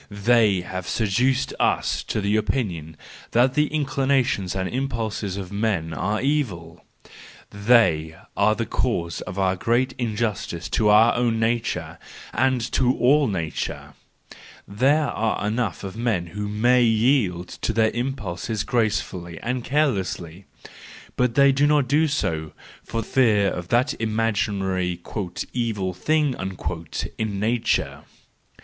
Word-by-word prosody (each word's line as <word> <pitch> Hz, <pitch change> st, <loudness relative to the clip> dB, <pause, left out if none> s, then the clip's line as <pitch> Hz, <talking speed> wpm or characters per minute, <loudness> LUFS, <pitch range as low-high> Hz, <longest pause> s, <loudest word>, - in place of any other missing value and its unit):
They 105 Hz, -2 st, +3 dB
have 90 Hz, +1 st, -6 dB
seduced 125 Hz, +5 st, +1 dB
us -, -, +1 dB
to 105 Hz, -, -2 dB
the 100 Hz, +1 st, +1 dB
opinion 90 Hz, -, -2 dB, 0.4 s
that 125 Hz, +2 st, +4 dB
the 150 Hz, +1 st, +2 dB
inclinations 135 Hz, -, 0 dB
and 95 Hz, -1 st, -1 dB
impulses 110 Hz, -6 st, -3 dB
of 95 Hz, -2 st, -6 dB
men 100 Hz, -6 st, -1 dB
are 105 Hz, +6 st, -1 dB
evil; 95 Hz, -, -2 dB, 0.7 s
they 100 Hz, -8 st, +3 dB, 0.2 s
are 105 Hz, +2 st, +3 dB
the 115 Hz, +1 st, -2 dB
cause 85 Hz, -11 st, -2 dB
of 90 Hz, -, -7 dB
our 95 Hz, -1 st, +2 dB
great 120 Hz, +7 st, +1 dB
injustice 105 Hz, -7 st, -2 dB
to 105 Hz, +4 st, +2 dB
our 110 Hz, +3 st, +6 dB
own 115 Hz, -2 st, +1 dB
nature, 115 Hz, +1 st, -1 dB, 0.3 s
and 130 Hz, +1 st, +2 dB
to 130 Hz, -1 st, +2 dB
all 140 Hz, +3 st, +4 dB
nature! 85 Hz, -7 st, -4 dB, 0.7 s
There 135 Hz, +9 st, +2 dB
are 110 Hz, -2 st, -1 dB
enough 110 Hz, -4 st, -2 dB
of 95 Hz, 0 st, -6 dB
men 115 Hz, -7 st, 0 dB
who 105 Hz, 0 st, -3 dB
may 120 Hz, +5 st, +3 dB
yield 110 Hz, -6 st, +2 dB
to -, -, 0 dB
their 110 Hz, 0 st, +2 dB
impulses 110 Hz, -4 st, -3 dB
gracefully 95 Hz, -7 st, -1 dB
and 125 Hz, 0 st, -2 dB
carelessly: 95 Hz, -, -1 dB, 0.7 s
but 125 Hz, -2 st, +1 dB
they 140 Hz, -1 st, +6 dB
do 140 Hz, +2 st, +3 dB
not 145 Hz, -3 st, +3 dB
do 150 Hz, +4 st, +3 dB
so, 80 Hz, -, -2 dB, 0.3 s
for 115 Hz, 0 st, -3 dB
fear 105 Hz, -5 st, +3 dB
of 90 Hz, -1 st, -5 dB
that 120 Hz, +7 st, +2 dB
imaginary 100 Hz, -5 st, -1 dB, 0.3 s
" 90 Hz, -, -7 dB
evil 110 Hz, -6 st, -1 dB
thing 150 Hz, -, +1 dB, 0.4 s
" 80 Hz, -1 st, -7 dB
in 105 Hz, -3 st, -2 dB
nature! 115 Hz, +3 st, 0 dB
110 Hz, 130 wpm, -23 LUFS, 95-125 Hz, 0.7 s, our